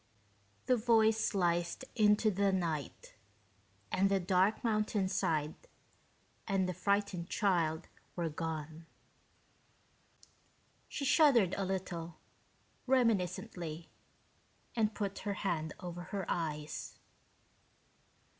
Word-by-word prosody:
The 255 - +3
voice 220 -1 +3
sliced 175 +4 0
into 210 0 +4
the 200 +1 +2
night, 165 -7 -3 0.8
and 195 +1 +3
the 195 -1 +2
dark 185 +3 +2
mountainside 195 -8 0 0.9
and 195 -3 +1
the 185 - -2
frightened 200 -2 0
child 175 -5 +1 0.3
were 170 -2 -1
gone. 160 0 -5 2.0
She 280 - -4
shuddered 255 - +5
a 195 - -1
little, 175 -3 -4 0.7
reminiscently, 185 -8 0 0.8
and 220 -2 +1
put 200 -2 -3
her 205 -1 -3
hand 160 -5 -2
over 175 -1 -6
her 195 0 -4
eyes. 150 -3 -3
190 Hz, 90 wpm, -33 LUFS, 170-210 Hz, 2.0 s, shuddered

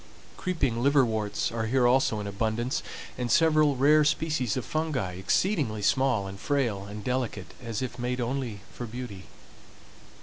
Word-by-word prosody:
Creeping 140 -10 -1
liverworts 120 -8 +2
are 115 -1 -2
here 125 +1 +3
also 120 -3 +3
in 105 - -4
abundance, 110 +5 -1 0.4
and 125 -1 -1
several 155 -3 +4
rare 150 +4 +5
species 150 -6 0
of 130 - -3
fungi, 155 - -1
exceedingly 110 - 0
small, 130 -3 +2
and 95 0 -7
frail, 120 -8 0
and 105 +1 -7
delicate, 125 -6 -2
as 115 0 -3
if 125 -1 -5
made 125 +1 -2
only 120 -4 -3
for 120 - -6
beauty. 115 -5 -7
125 Hz, 145 wpm, -28 LUFS, 110-140 Hz, 0.4 s, rare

